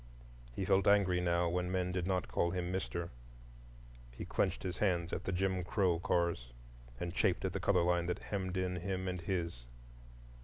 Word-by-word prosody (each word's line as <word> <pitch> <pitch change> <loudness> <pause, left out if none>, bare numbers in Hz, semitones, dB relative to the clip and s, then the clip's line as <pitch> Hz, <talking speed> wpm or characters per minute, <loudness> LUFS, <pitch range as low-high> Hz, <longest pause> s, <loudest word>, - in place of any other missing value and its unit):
He 95 - -1
felt 95 0 +3
angry 95 -3 +4
now 85 0 +2
when 90 +1 -1
men 90 -1 0
did 90 -1 -1
not 90 -2 0
call 85 - +1
him 90 0 -2
"Mister," 85 -2 -3 1.0
he - - -7
clenched - - 0
his 90 -1 -3
hands 85 -4 +1
at - - -3
the - - -1
"Jim 95 0 0
Crow" 90 -1 +1
cars, 85 -9 0 0.5
and 85 -1 -3
chafed 95 -1 +2
at 95 - -1
the 100 - -1
color 90 -1 +3
line 85 0 +2
that 90 +2 -2
hemmed 95 -2 -2
in 90 -1 -1
him 95 +1 -2
and 90 -1 -2
his. 85 -8 -2
90 Hz, 185 wpm, -35 LUFS, 85-95 Hz, 1.0 s, angry